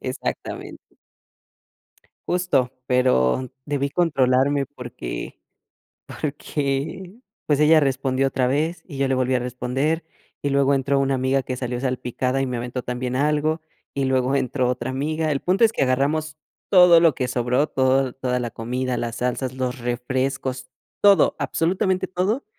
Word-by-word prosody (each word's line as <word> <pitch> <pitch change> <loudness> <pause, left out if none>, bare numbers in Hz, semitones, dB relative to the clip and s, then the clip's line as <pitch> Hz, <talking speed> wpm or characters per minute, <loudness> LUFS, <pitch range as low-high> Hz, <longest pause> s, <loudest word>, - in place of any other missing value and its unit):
Exactamente. - - -5 1.5
Justo, 175 -8 +1 0.2
pero 125 - +2
debí 140 -1 -1
controlarme 140 -3 +2
porque 120 - -7 0.8
porque, 145 +5 -3 0.3
pues, 145 -1 +2
ella 155 +1 +6
respondió 135 -1 +1
otra 130 -1 0
vez 155 +7 -1
y 150 - -9
yo 135 -1 +1
le 135 - +2
volví 130 0 +1
a - - +3
responder 125 +6 -2 0.4
y 145 - 0
luego 140 0 +3
entró 140 +1 +1
una 135 0 +1
amiga 130 +1 +1
que 130 0 -4
salió 125 -1 -3
salpicada 130 0 -1
y 135 - 0
me 125 -1 -3
aventó 125 +1 -4
también 125 +1 -3
algo 150 +3 +1 0.3
y 140 - 0
luego 130 0 +1
entró 125 -2 0
otra 125 0 -2
amiga. 155 +4 -1
El 140 -2 0
punto 190 +5 +2
es 225 - +4
que - - -1
agarramos 145 +4 0 0.3
todo 180 -3 +7
lo 165 -4 +4
que 125 0 -2
sobró, 125 +3 +1
todo, 130 0 +2
toda 125 -2 -1
la 120 -1 -3
comida, 125 +3 -3
las 115 -1 -3
salsas, 125 +1 -2
los 130 0 -3
refrescos, 130 +2 -2 0.3
todo, 200 -1 +5
absolutamente 185 +2 0
todo 190 +8 -1
135 Hz, 150 wpm, -23 LUFS, 125-150 Hz, 1.5 s, todo